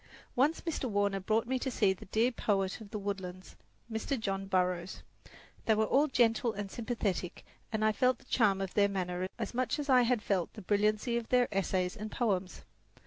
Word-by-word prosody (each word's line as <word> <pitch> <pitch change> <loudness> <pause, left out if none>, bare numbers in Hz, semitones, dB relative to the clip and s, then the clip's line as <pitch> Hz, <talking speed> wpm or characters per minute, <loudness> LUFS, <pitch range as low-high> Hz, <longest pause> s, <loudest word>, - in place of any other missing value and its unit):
Once 290 +6 +2
Mr. 330 -5 -3
Warner 200 -1 +1
brought 220 +4 0
to 260 +1 -1
see 215 -5 +2
me - - +3
the 190 - -12
dear 225 +5 +2
poet 195 -3 -1
of 210 - -10
the 215 - -4
woodlands 190 -2 -5 0.3
Mr. 230 +4 -2
John 195 -2 -2
Burroughs. 180 -1 -1 0.6
They 220 - +5
were 220 +1 +2
all 280 +7 +3
gentle 235 -3 +2
and 200 -1 -5
sympathetic 220 -7 -3 0.3
and 215 -1 0
I 215 - +5
felt 250 +3 +2
the - - -21
charm 200 -5 +2
of 190 -1 -4
their 200 -1 +4
manner 185 -1 -2
as 225 -2 -4
much 255 +4 0
as 290 -1 -4
I 255 -1 +7
had 240 -3 +1
felt 185 -4 0
the 215 - -10
brilliancy 215 +4 +1
of 235 -1 -4
their 250 -1 +4
essays 185 -2 0
and 215 0 -6
poems. 190 - -1
215 Hz, 195 wpm, -32 LUFS, 195-240 Hz, 0.6 s, I